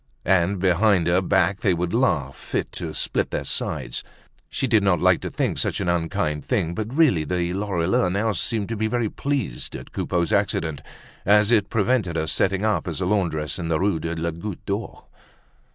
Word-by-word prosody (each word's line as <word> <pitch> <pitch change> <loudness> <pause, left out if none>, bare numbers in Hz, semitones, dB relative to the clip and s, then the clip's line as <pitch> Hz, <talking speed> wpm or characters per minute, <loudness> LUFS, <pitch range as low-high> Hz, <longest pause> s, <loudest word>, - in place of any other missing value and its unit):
And 95 +1 +2
behind 95 0 +3
her 85 +2 +3
back 95 +1 +2
they 95 -4 +2
would 85 0 -2
laugh 85 - +1
fit - - -4
to - - -5
split - - 0
their - - -3
sides. - - -2 0.5
She - - -1
did 115 -4 +3
not 95 -4 +2
like - - +3
to - - -4
think - - -1
such - - 0
an 95 - -2
unkind 80 -3 -1
thing, 95 -10 0
but, 110 +5 -4
really, 135 - +3
the 85 +3 -1
Lorilleuxs 95 -2 0
now 105 +4 +1
seemed 105 +1 -1
to 115 - -2
be 110 +1 0
very 115 -1 0
pleased 135 - -3
at - - -9
Coupeau's 85 +2 -1
accident, 85 -7 0 0.4
as 105 +2 +4
it 105 -4 +3
prevented 110 -5 +1
her 80 -1 0
setting 95 +5 +1
up 105 -3 0
as 85 -1 -3
a 95 - -1
laundress 90 -6 0
in 85 - -3
the 80 -1 +1
Rue 95 -4 +1
de 80 +2 -3
la 85 +1 -2
Goutte 85 +4 -7
d'Or. 100 +3 -4
95 Hz, 195 wpm, -23 LUFS, 85-105 Hz, 0.5 s, as